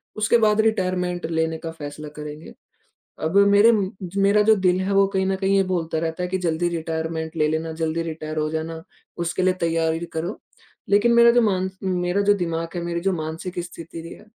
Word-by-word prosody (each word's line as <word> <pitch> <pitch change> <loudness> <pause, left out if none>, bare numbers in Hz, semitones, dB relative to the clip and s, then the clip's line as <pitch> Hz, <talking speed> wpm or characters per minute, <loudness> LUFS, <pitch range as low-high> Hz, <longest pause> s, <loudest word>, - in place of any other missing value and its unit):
उसके 220 +2 +3
बाद 215 -1 +3
रिटायरमेंट 185 -4 0
लेने 160 0 0
का 165 0 -6
फैसला 150 -1 -8
करेंगे। 150 +1 -8 0.7
अब 160 +5 +1
मेरे 205 +3 +6
म 210 -3 +2 0.2
ज - - -13
मेरा 200 +1 +4
जो 220 +1 +5
दिल 185 -2 +2
है 190 +1 -1
वो 195 0 +5
कहीं 190 -1 -1
न 195 - +1
कहीं 195 +1 +1
ये 195 - +4
बोलता 165 -3 -1
रहता 165 +2 -3
है - - -1
कि 190 - 0
जल्दी 175 -1 0
रिटायरमेंट 160 -1 -3
ले 150 -1 +3
लेना, 160 +1 -2
जल्दी 160 +1 -2
रिटायर 155 -1 -6
हो 155 0 0
जाना, 160 +1 -4 0.4
उसके 170 +2 -1
लिए 185 0 +3
तैयारी 165 0 0
करो। 170 +5 -4 0.5
लेकिन 205 +4 +4
मेरा 235 0 +7
जो 240 +1 +4
मान 190 -4 +1
उम, 190 - -1
मेरा 180 +3 +1
जो 205 0 +4
दिमाग 165 -3 -2
है, 175 - -2
मेरी 170 0 -2
जो 195 +1 +1
मानसिक 165 +2 -5
स्थिति 170 -1 -9
रही 165 - -9
है, - - -16
175 Hz, 215 wpm, -23 LUFS, 160-195 Hz, 0.7 s, मेरा